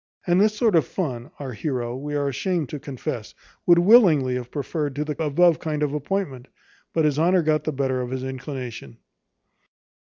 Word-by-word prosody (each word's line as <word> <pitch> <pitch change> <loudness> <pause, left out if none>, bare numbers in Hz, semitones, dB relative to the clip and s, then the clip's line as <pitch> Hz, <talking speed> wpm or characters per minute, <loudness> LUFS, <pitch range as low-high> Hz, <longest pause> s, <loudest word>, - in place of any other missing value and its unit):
And 175 +1 +3
this 215 0 +3
sort 225 -5 +3
of 155 -7 +3
fun, 130 -10 -4
our 135 -3 -6
heroe, 120 0 -3
we 145 +3 -5
are 145 -1 0
ashamed 165 +2 -1
to 150 - -5
confess, 130 -5 -6 0.3
would 175 -1 +7
willingly 175 - +5
have 125 -1 -4
preferred 145 0 -3
to 150 +1 -2
the 150 -1 -3
above 165 +3 +3
kind 150 -2 -2
appointment; 145 -2 -2 0.4
but 160 -2 +1
his 150 -1 +1
honour 175 +2 +3
got 155 0 +1
the 155 - 0
better 130 -2 -1
of 125 - -4
his 130 0 -4
inclination. 130 - -6
145 Hz, 180 wpm, -24 LUFS, 130-165 Hz, 0.4 s, would